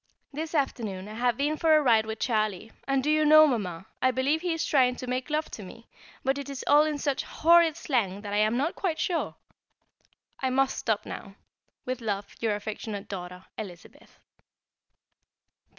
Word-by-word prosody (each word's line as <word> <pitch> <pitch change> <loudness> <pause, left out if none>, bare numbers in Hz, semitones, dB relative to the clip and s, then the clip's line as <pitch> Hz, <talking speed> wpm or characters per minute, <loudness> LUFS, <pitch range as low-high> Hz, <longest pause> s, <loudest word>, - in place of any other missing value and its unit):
This 315 +3 -4
afternoon 215 -9 -2
I 215 - -8
have 240 +1 0
been 295 +3 0
for 320 -1 +4
a - - +6
ride 225 -4 +4
with 220 0 -4
Charlie, 215 -3 -1 0.2
and 275 -1 +1
do 300 - +2
you 310 0 +3
know, 310 +1 +8
Mamma, 190 - -2 0.2
I 255 - +4
believe 270 +5 +1
he 355 -1 -1
is 325 0 -1
trying 255 -3 +3
to 255 - -7
make 255 +2 -3
love 305 +1 -1
to - - -7
me, 215 +4 -12 0.4
but 270 +1 +1
it 280 0 -6
is 275 -2 -5
all 295 +1 +6
in 305 -1 -1
such 280 -1 -1
horrid 335 -1 +4
slang 205 -8 -1
that 205 -1 -6
I - - +1
am 215 +3 +2
not 295 +6 0
quite 340 -5 -2
sure. 345 0 -1 1.0
I 260 - 0
must 270 +1 +1
stop 220 -3 -1
now. 195 -1 -8 0.5
With 255 -1 -3
love, 205 -2 -2
from - - -20
your 220 -2 +1
affectionate 210 -1 -6
daughter, 180 -1 -7
Elizabeth. 180 -5 -10
255 Hz, 190 wpm, -27 LUFS, 215-295 Hz, 1.0 s, know